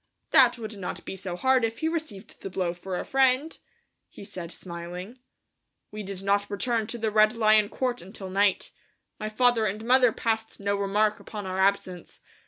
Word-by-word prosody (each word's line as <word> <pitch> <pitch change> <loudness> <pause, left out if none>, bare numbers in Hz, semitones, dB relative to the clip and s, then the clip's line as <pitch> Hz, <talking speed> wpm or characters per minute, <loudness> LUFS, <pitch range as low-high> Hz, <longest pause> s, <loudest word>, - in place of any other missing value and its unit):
"That 250 -3 +6
would 220 -2 -7
not 180 - -5
be - - -5
so 185 -2 -5
hard 260 +5 +3
if 225 0 -1
he 320 - -1
received 310 - -5
the - - -5
blow 180 -2 -1
for 180 +1 -5
a - - -4
friend," 270 +3 +2 0.5
he - - -12
said, 180 -3 -7
smiling. 180 +7 -8 0.7
We 210 0 -6
did 195 -1 -7
not 200 +1 +1
return 225 +2 -1
to 240 - -5
the 220 -1 -1
Red 215 +1 +4
Lion 215 -2 +4
Court 250 0 -2
until 190 +1 -9
night. 200 0 +2 0.5
My 215 - -3
father 235 0 +3
and 210 +3 -4
mother 250 0 +5
passed 225 0 -2
no 200 0 0
remark 210 +2 +1
upon 210 -2 -7
our 185 0 -3
absence. 190 -2 0
210 Hz, 185 wpm, -27 LUFS, 195-235 Hz, 0.7 s, That